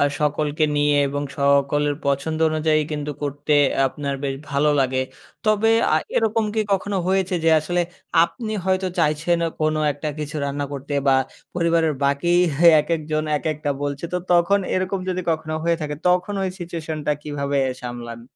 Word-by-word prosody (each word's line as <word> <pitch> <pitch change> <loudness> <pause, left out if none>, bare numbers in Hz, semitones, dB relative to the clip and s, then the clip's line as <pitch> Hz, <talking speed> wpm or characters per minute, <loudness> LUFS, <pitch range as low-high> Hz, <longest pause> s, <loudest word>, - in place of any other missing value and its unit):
আ - - +4 0.2
সকলকে 150 +1 +1
নিয়ে 145 0 +3
এবং 145 +1 -3 0.2
সকলের 140 +1 +2
পছন্দ 140 +3 0
অনুযায়ী 155 0 +2
কিন্তু 150 0 -3
করতে 145 +1 -1 0.3
আপনার 140 +1 -3
বেশ 135 -1 -1 0.2
ভালো 140 +2 +2
লাগে। 130 0 +1 0.5
তবে 215 +1 +3 0.2
আ - - +4 0.2
এরকম 225 0 +2
কি 220 - +1
কখনো 195 +1 0
হয়েছে 190 0 +1
যে 165 - +5
আসলে 175 +3 -1 0.4
আপনি 220 +4 -5
হয়তো 190 0 +1
চাইছেন 160 +2 +2 0.2
কোন 155 0 +2 0.2
একটা 145 +2 -5
কিছু 150 +1 -5
রান্না 140 0 -2
করতে 140 +1 -6 0.2
বা 135 - +6 0.4
পরিবারের 165 -2 +2
বাকি 140 +5 +1 0.5
একেকজন 155 -1 -2
একেকটা 150 -1 -2
বলছে 145 +1 -3
তো 180 - +1
তখন 175 +3 +4 0.2
এরকম 185 +1 -1
যদি 185 0 -1
কখনো 155 -1 -2
হয়ে 170 0 +2
থাকে 150 -1 -3
তখন 180 +3 +1
ওই 190 - 0
সিচুয়েশন 165 -3 -5
টা 150 - +3
কীভাবে 140 -1 -2 0.2
সামলান? 120 -1 -7
155 Hz, 155 wpm, -22 LUFS, 145-175 Hz, 0.5 s, বা